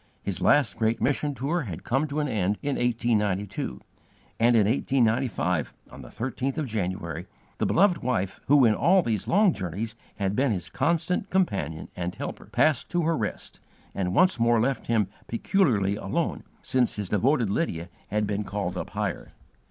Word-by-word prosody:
His 95 -3 -2
last 145 -1 +3
great 115 +1 +1
mission 145 +3 0
tour 145 +8 -1
had 95 - -6
come 135 +5 0
to 145 +1 -3
an 150 - 0
end 105 -4 0
in 145 -1 0
1892, 105 -5 -1 0.6
and 120 +1 +4
in 110 -3 +5
1895, 115 - +1 0.2
on - - -10
the - - -11
13th 130 +3 -3
of 155 - -1
January, 90 - -3 0.3
the - - +1
beloved 180 -2 +3
wife 100 -7 -1
who 140 -1 +6
in 110 - +5
all 185 - +4
these 110 - -2
long 200 0 +4
journeys 100 +4 -4 0.2
had 100 -1 -1
been 135 +1 +2
his 90 -5 -3
constant 170 +6 0
companion 100 - -1
and 90 0 -4
helper, - - -6
passed 155 -1 +2
to 175 -1 0
her 165 +1 +2
rest, 110 -6 -5 0.3
and 90 -1 -2
once 185 -8 +4
more 115 0 +4
left 130 +4 -1
him 110 -4 +2 0.2
peculiarly 115 - +1
alone, 95 - -2 0.2
since 125 -2 +1
his 105 -3 -4
devoted 115 0 +2
Lydia 85 - -1 0.2
had 105 +1 0
been 105 0 -2
called 95 -3 -3
up - - -5
higher. - - -4
115 Hz, 170 wpm, -26 LUFS, 100-140 Hz, 0.6 s, who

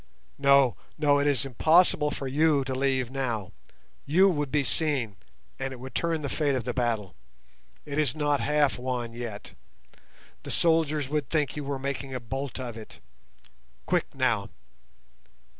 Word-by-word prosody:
No, 140 -5 +5 0.2
no; 145 -2 +3
it 145 - +1
is 140 -1 +2
impossible 155 +3 +4
for 140 - -5
you 145 +1 +3
to 130 0 -4
leave 130 -2 0
now. 120 -8 -3 0.6
You 185 +7 +5
would 145 -6 -1
be 150 -1 +2
seen, 135 -9 0 0.4
and 135 0 -3
it 130 - -8
would 130 +1 -9
turn 165 -2 -1
the - - -1
fate 145 0 0
of 125 - -2
the 125 - -3
battle. 115 -6 -1 0.7
It 145 0 -3
is 150 -2 +1
not 145 -2 +1
half 150 -3 +1
won 125 -2 -3
yet. 115 -3 -7 0.9
The - - -9
soldiers 155 -4 +2
would 150 -4 -1
think 150 -3 0
you 150 - -4
were 140 0 -3
making 135 0 -4
a - - -2
bolt 135 +4 -5
of 120 -3 -5
it. 110 - -11 0.9
Quick - - -1
now." - - +1
140 Hz, 160 wpm, -27 LUFS, 125-150 Hz, 0.9 s, No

